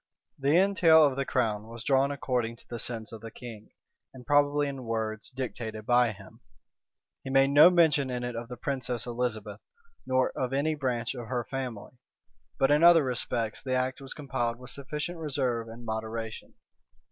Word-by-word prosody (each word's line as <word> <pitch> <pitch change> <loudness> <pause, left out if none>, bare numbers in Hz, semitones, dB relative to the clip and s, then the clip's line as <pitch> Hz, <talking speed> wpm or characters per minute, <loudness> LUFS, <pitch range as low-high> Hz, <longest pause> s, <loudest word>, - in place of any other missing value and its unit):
The 140 +4 +3
entail 170 -5 +6
of 140 -3 +1
the 140 0 -2
crown 110 -4 0
was 115 0 -8
drawn 135 0 +3
according 125 -4 -2
to - - -18
the 120 - -6
sense 115 -2 -3
of 110 - -9
the 115 - -7
king, 110 -3 -10 0.5
and 125 -1 -12
probably 145 0 +3
in 135 -3 -6
words 110 -1 -3
dictated 115 -4 -5
by 120 -1 +4
him. 95 +2 -14 0.8
He - - -6
made 135 +1 +4
no 150 +4 +9
mention 160 -6 +3
in 125 -1 -3
it 120 -1 -4
of 115 +1 -5
the 125 0 -8
princess 125 -2 -3
Elizabeth, 110 -4 -3 0.5
nor 130 0 +2
of 130 0 -3
any 145 +3 +1
branch 125 -5 -2
of 120 -3 -7
her 120 0 -2
family: 125 -2 -6 0.6
but 135 - +3
in 150 +2 +4
other 170 -2 +8
respects 120 -3 -2
the 130 -1 -2
act 130 +2 -1
was 135 - -8
compiled 120 -5 -2
with 125 +1 -11
sufficient 150 +5 -5
reserve 130 -7 -1
and 115 +1 -10
moderation. 110 0 -5
125 Hz, 180 wpm, -28 LUFS, 115-140 Hz, 0.8 s, no